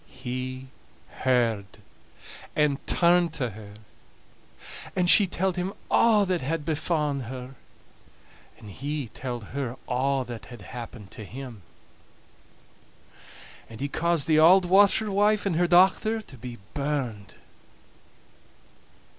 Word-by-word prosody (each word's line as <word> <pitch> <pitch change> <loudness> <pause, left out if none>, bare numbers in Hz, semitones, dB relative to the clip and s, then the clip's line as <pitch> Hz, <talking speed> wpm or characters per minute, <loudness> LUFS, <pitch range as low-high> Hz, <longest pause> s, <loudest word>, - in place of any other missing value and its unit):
He 130 0 -6 0.5
heard, 120 -5 +1 0.9
and 150 -2 +1
turned 175 -1 +3
to 125 -7 -2
her. 105 0 -11 1.2
And 180 -1 +1
she 200 +2 +6
telled 185 0 -1
him 180 +2 -2 0.2
a' 215 -3 +5
that 180 -1 0
had 150 +3 -2
befa'en 150 -4 -1
her, 130 +2 -8 1.0
and 105 -3 -12
he 140 +2 -4
telled 120 -4 -6
her 130 -3 -3
a' 135 +2 0
that 120 -2 -8
had 120 -4 -11
happened 115 -1 -9
to 110 - -9
him. 120 0 -9 2.1
And 115 -1 -11
he 140 - -2
caused 170 +1 0
the 155 -1 +4
auld 180 +4 +7
washerwife 205 +2 +4
and 190 -4 0
her 175 0 +3
dochter 190 +5 +4
to 135 - -14
be 120 0 -8 0.2
burned. 135 -8 -3
140 Hz, 115 wpm, -26 LUFS, 125-175 Hz, 2.1 s, auld